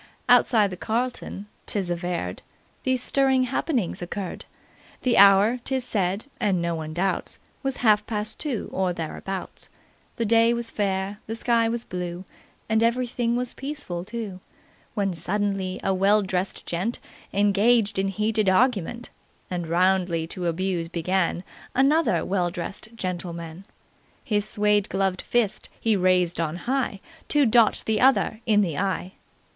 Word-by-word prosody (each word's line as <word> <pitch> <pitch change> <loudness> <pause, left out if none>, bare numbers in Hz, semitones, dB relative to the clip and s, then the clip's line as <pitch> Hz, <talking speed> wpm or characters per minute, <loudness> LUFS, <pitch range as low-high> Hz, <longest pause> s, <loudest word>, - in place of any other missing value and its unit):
"Outside 235 -4 +5
the 180 - -6
'Carlton,' 230 -2 -3 0.2
'tis 190 -4 -1
averred, 175 0 -3 0.4
these 260 -1 0
stirring 265 -1 +3
happenings 255 - -1
occurred. 180 +1 -5 0.6
The 250 - +3
hour, 200 +5 +6
'tis 265 -1 -1
said 200 -3 -1
(and 200 -6 +1
no 170 0 -1
one 160 -1 -4
doubts) 185 +3 -1 0.2
was 270 -2 -2
half 210 -1 +4
past 215 -1 -3
two, 280 -8 -2
or 185 -1 0
thereabouts. 180 +3 -6 0.5
The 230 - -1
day 230 +2 +4
was 235 -1 -4
fair, 195 0 -1
the 225 - -3
sky 230 -1 +2
was 235 0 -2
blue, 180 -1 -5 0.4
and 220 0 +2
everything 235 0 +1
was 250 0 -2
peaceful 270 -12 -5
too, 210 -2 -6 0.6
when 195 -3 0
suddenly 190 +2 -2
a 195 - +2
well 200 +3 +4
dressed 190 0 -3
gent 185 +8 -2 0.3
engaged 205 +1 +3
in 195 - +1
heated 210 +1 +1
argument 235 +2 +1 0.4
and 175 -2 -2
roundly 175 -1 +2
to 180 -1 -3
abuse 175 0 -1
began 175 +1 0 0.3
another 270 - +3
well 180 -2 0
dressed 185 +4 -6
gentleman. 175 -2 -5 0.6
His 210 -2 0
suede 210 -1 +2
gloved 190 -1 0
fist 235 -4 0
he 225 -2 +2
raised 180 -2 +2
on 160 0 -2
high 250 -6 -1 0.3
to 295 -2 +4
dot 230 -1 +4
the 220 -1 +1
other 255 -4 +3
in 210 -2 +5
the 170 -6 -1
eye. 190 -1 -1
200 Hz, 140 wpm, -25 LUFS, 180-230 Hz, 0.6 s, hour